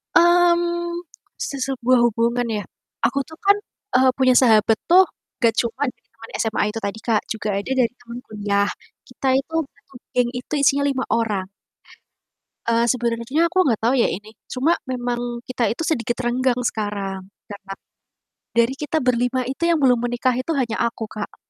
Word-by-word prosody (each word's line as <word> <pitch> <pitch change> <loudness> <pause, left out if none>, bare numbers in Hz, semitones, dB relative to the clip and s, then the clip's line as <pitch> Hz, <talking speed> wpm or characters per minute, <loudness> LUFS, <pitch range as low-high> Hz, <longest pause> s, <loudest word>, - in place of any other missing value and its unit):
Mmm, 345 0 +3 0.4
se 280 - -3
sebuah 255 -2 +2
hubungan 235 +1 +1
ya. 205 - -4 0.4
Aku 275 - +1
tuh 320 - -13
kan, 400 +1 +6 0.4
eee, 260 0 +5
punya 260 -1 +4
sahabat 220 -3 +5
tuh 370 +2 +8 0.4
nggak 230 -2 +4
cuman 250 +5 -1
dari - - -19
teman 225 0 -13
SMA 225 -1 0
itu 220 +2 -4
tadi, 200 +2 -4
Kak, 220 -2 +1
juga 215 -1 -4
ada 205 +6 -4
dari 235 - +1
teman 240 0 -9
kuliah. 205 -1 0 0.4
Kita 270 - -5
itu 270 +5 -1 0.2
satu - - -26 0.2
geng 245 -1 +2
itu 250 - -10
isinya 280 0 +3
5 265 -2 0
orang. 210 -5 0 1.2
Eee, 230 0 +3
sebenarnya 240 +7 0
aku 370 - -3
nggak 225 -4 +1
tau 235 - +3
ya 260 -3 +3
ini, 210 +4 -5 0.2
cuma 265 +6 +1 0.2
memang 245 -1 -3
kita 245 -3 -1
itu 240 +10 -2
sedikit 240 -7 0
renggang 245 +1 +1
sekarang, 200 -4 -3 0.2
karena 200 -1 -9 0.8
dari 235 +2 +3
kita 310 +2 -1
ber-5 250 0 +1
itu 270 +6 -2
yang 335 -3 +2
belum 250 -2 +5
menikah 245 +1 0
itu 270 +6 -1
hanya 250 -6 -1
aku, 225 -2 -4
Kak. 210 -1 -7
245 Hz, 165 wpm, -22 LUFS, 225-270 Hz, 1.2 s, tuh